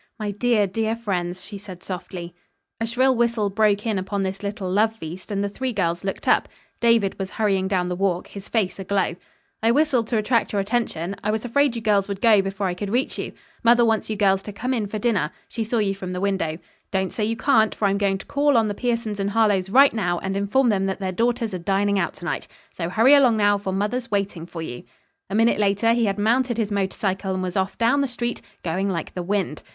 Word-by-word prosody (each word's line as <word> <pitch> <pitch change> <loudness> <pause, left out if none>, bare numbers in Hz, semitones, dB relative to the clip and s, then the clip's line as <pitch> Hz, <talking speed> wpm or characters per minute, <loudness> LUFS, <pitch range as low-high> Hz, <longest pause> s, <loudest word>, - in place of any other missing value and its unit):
"My 210 -2 -3
dear, 215 0 +2
dear 220 +3 -1
friends," 180 -5 -3
she 205 -2 -8
said 190 -2 -11
softly. 175 -2 -6 0.5
A 225 - -1
shrill 255 +3 +3
whistle 230 -4 +1
broke 210 0 +2
in 215 -4 0
upon 195 +1 -2
this 190 0 -3
little 200 -1 -4
love 215 +4 +2
feast 180 -1 -8
and 200 -1 -1
the - - 0
three 255 +6 -3
girls 175 -3 -1
looked 195 - -4
up. - - +3 0.3
David 230 -5 +2
was 190 -1 -3
hurrying 195 -3 0
down 185 -2 0
the 180 - -2
walk, 180 -1 0
his 200 -1 -10
face 205 -5 0
aglow. 195 -2 0 0.5
"I 225 - +3
whistled 255 -3 +2
to 235 - 0
attract 220 +1 +1
your 205 - +1
attention. 195 -4 -1
I 210 - 0
was 220 +2 -1
afraid 275 +1 +2
you 230 - -5
girls 205 -2 +2
would 200 -1 -4
go 220 -3 +5
before 195 +1 -3
I 180 - 0
could 195 +3 -5
reach 245 +5 -1
you. - - -4 0.3
Mother 235 0 +5
wants 225 -1 +1
you 215 - -1
girls 195 -2 +3
to 210 - -7
come 250 +6 -2
in 220 -5 -1
for 215 - -4
dinner. 205 -8 +1 0.2
She 230 - -3
saw 230 +2 -1
you 205 -3 +1
from 185 -2 -6
the 180 - -3
window. 190 -5 -1 0.3
Don't 190 -1 -1
say 215 - -2
you 225 +2 -1
can't, 220 -3 +3
for 205 - +1
I'm 200 0 0
going 195 -1 +1
to 195 - -11
call 285 -2 +2
on 220 -2 +3
the - - -1
Piersons 230 -2 -2
and 195 0 0
Harlowes 205 -3 +2
right 275 +6 +6
now 175 -6 0
and 190 +2 -3
inform 210 +6 +2
them 195 -2 +1
that 190 - -3
their 190 -1 -2
daughters 230 +2 0
are 185 - -3
dining 200 +2 +1
out 170 - -1
to 175 - -10
night. - - -3 0.3
So 170 -1 -3
hurry 225 +9 +5
along 260 -6 +5
now, 205 -1 +3
for 195 -1 -3
mother's 210 +6 -2
waiting 195 -5 -2
for 165 -2 -6
you." 120 -6 -6 0.5
A 195 - -3
minute 225 0 +3
later 205 +3 +3
he 235 -1 +2
had 200 -1 0
mounted 240 +3 +1
his 215 -2 -1
motorcycle 190 -1 -1
and 185 - -2
was 180 -1 -4
off 190 0 -1
down 240 +5 +3
the 275 - +1
street, 240 -1 -3 0.2
going 185 +4 -1
like 170 -4 -3
the 180 - -4
wind. 185 -4 -2
205 Hz, 240 wpm, -23 LUFS, 190-230 Hz, 0.5 s, right